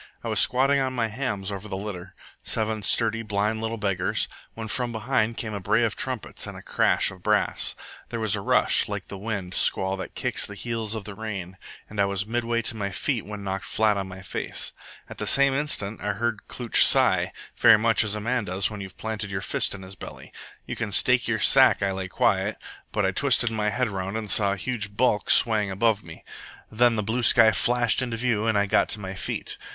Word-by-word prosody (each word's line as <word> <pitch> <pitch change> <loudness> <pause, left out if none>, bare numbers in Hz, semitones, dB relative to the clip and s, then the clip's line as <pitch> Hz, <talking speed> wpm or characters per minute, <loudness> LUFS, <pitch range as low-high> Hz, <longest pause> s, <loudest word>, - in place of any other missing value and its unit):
I - - -4
was - - +1
squatting 135 +2 +4
on 130 -1 -1
my 115 -3 -1
hams 105 -5 -3
over 100 +1 -6
the 95 -2 -5
litter 95 -3 -7 0.3
seven 110 0 -1
sturdy, 115 +2 +1
blind 105 0 -1
little 115 0 -3
beggars 100 -4 0 0.3
when 110 -1 -6
from 120 +2 -2
behind 115 0 -1
came 110 -2 -5
a 100 - -3
bray 110 +5 +1
of 115 - 0
trumpets 130 -4 -4
and - - -9
crash - - +2
of 95 -1 -13
brass. 105 +2 +1 0.3
There 115 - -4
was 110 -3 +1
a 100 - -4
rush, - - +2
like - - -5
the 100 - -7
wind 100 -4 -4
squall 95 +1 +3
that 95 - -8
kicks - - -2
the 105 - -9
heels 115 0 -3
of 110 - -5
the 105 - -8
rain, 95 -4 -6 0.3
and 105 -1 -2
I - - +4
was 100 0 -2
midway 115 +1 -1
to 115 - -1
my 100 -2 -3
feet 115 +4 -2
when 105 -1 -7
knocked 95 0 -4
flat 110 -1 +1
on 100 -1 -3
my 95 +1 -10
face. - - -2 0.3
At - - -11
the - - -3
same 140 0 +4
instant 135 -8 -2
I 105 0 -1
heard 115 0 -3
Klooch 120 -3 +3
sigh, - - +4 0.2
very - - +6
much 115 +2 +2
as 110 -1 -1
a - - -3
man 120 +1 -1
does 95 +3 0
when 105 -2 -7
you've 95 -1 -9
planted 110 -2 -4
your 95 -1 -3
fist 100 - -1
in 95 - -10
his 95 +1 -9
belly. 95 - -11 0.3
You - - -5
can - - -4
stake - - +3
your - - 0
sack - - +5
I 100 - +1
lay 95 0 -4
quiet, 95 - +1 0.4
but - - 0
I - - +1
twisted 120 - +2
my 105 -1 -1
head 125 +4 0
around 95 +1 -4
and 110 -2 -5
saw 100 -2 +3
a - - -5
huge 105 -1 -4
bulk 105 -5 +1
swaying 110 -3 +5
above 105 +2 +1
me. 80 -1 -12 0.5
Then 120 +1 +3
the 105 - -1
blue 115 +4 -1
sky 115 -1 +5
flashed 120 +3 +1
into 120 -3 -3
view 115 -2 0
and 110 -2 +2
I 100 - +2
got 100 - +2
to 110 - -1
my 95 -2 -6
feet. 95 - -5
105 Hz, 225 wpm, -25 LUFS, 100-115 Hz, 0.5 s, very